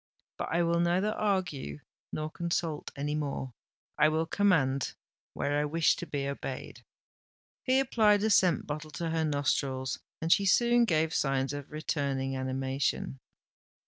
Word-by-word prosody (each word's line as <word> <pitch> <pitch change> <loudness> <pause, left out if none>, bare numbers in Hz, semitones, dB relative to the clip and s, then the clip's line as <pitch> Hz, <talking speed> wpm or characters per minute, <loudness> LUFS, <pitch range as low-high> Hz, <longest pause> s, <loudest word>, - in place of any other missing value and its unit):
"But - - -3
I 170 +1 +2
will 170 0 +2
neither 180 +5 +2
argue 180 - -2 0.3
nor 155 0 -3
consult 170 -2 -2
any 145 +1 -2
more—I 145 +1 -2
will 160 +1 0
command, 160 -9 +2 0.4
where 145 +1 0
I 150 - +1
wish 160 +2 +3
to - - -6
be 140 -1 -2
obeyed." 140 -1 -6 0.8
He 260 0 +3
applied 215 -6 +3
a 220 - +2
scent 180 -4 +4
bottle 155 +1 -5
to 165 +2 -3
her 160 0 +1
nostrils; 140 -3 0 0.2
and 165 +1 +4
she 200 - +1
soon 240 +3 +4
gave 160 -4 +1
signs 135 -2 0
of 145 -1 -6
returning 140 -3 -2
animation. 130 +1 -2
155 Hz, 145 wpm, -30 LUFS, 140-175 Hz, 0.8 s, scent